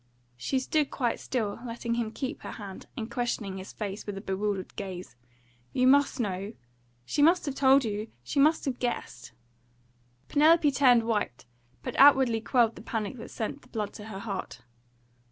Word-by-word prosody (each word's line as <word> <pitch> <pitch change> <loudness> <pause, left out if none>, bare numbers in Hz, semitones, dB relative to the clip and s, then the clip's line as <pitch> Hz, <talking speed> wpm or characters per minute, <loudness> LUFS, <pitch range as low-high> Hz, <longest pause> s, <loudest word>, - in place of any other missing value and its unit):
She 120 - -1
stood 290 +3 +1
quite 240 -4 -1
still, 220 -5 -2
letting 235 -1 -3
him 235 -2 -1
keep 260 +3 -5
her - - -7
hand, 200 -3 -9
and 220 - -3
questioning 225 -6 -2
his 190 +1 -8
face 205 -1 -5
with 205 -1 -4
a - - -5
bewildered 195 -1 -2
gaze. 185 -7 -6 0.6
"You 255 - +2
MUST 280 +1 +4
know 200 -1 -2 0.5
she 290 - 0
must 340 +4 +5
have 280 - -2
told 270 -1 +5
you 210 0 -3 0.2
she 200 - -2
must 310 +4 +4
have 265 -3 -2
guessed 125 - -4 0.5
" 120 +1 -38
Penelope 305 0 +5
turned 250 -3 +5
white, 210 - -2 0.4
but - - -4
outwardly 265 -5 +6
quelled 235 -1 +2
the - - -9
panic 225 +1 -3
that 230 - -9
sent 230 +6 -4
the - - -20
blood 215 -4 -4
to 210 - -9
her 215 -3 -7
heart. 195 - -5
225 Hz, 175 wpm, -28 LUFS, 200-265 Hz, 0.6 s, outwardly